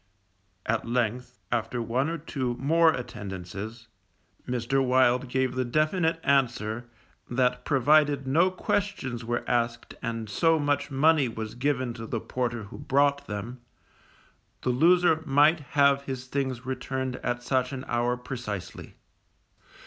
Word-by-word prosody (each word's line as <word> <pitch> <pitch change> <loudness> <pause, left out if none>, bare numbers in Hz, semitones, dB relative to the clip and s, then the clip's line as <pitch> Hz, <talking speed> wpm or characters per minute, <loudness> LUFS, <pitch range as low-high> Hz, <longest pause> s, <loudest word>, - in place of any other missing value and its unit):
_ - - -41 0.6
At 115 +1 -1
length, 125 +1 -1
after 120 +1 -1
one 125 +6 0
or 170 - -2
two 130 -6 -3
more 160 +4 +4
attendances, 105 - -6 0.6
Mr. 125 +2 0
Wild 125 0 +3
gave 130 0 0
the 130 0 0
definite 160 +6 +1
answer, 120 -4 +1 0.4
that 125 0 +1
provided 145 0 +3
no 165 +8 +3
questions 185 - -2
were 120 +1 -2
asked 120 -1 -1
and 115 -2 -3
so 165 +11 +3
much 145 -1 0
money 150 0 +3
was 110 -1 -5
given 130 -1 -1
to 115 -1 -8
the 115 - -2
porter 120 -1 -3
who 100 - -10
brought 140 +1 +2
them, 115 +5 -6 1.0
the 125 - +2
loser 165 +4 +4
might 150 +2 +4 0.2
have 140 -1 +5
his 130 -2 -5
things 130 -2 -3
returned 130 0 -3
at 120 0 -3
such 130 0 0
an 135 -1 -6
hour 120 +1 0
precisely. 120 -7 -6
125 Hz, 135 wpm, -27 LUFS, 120-140 Hz, 1.0 s, have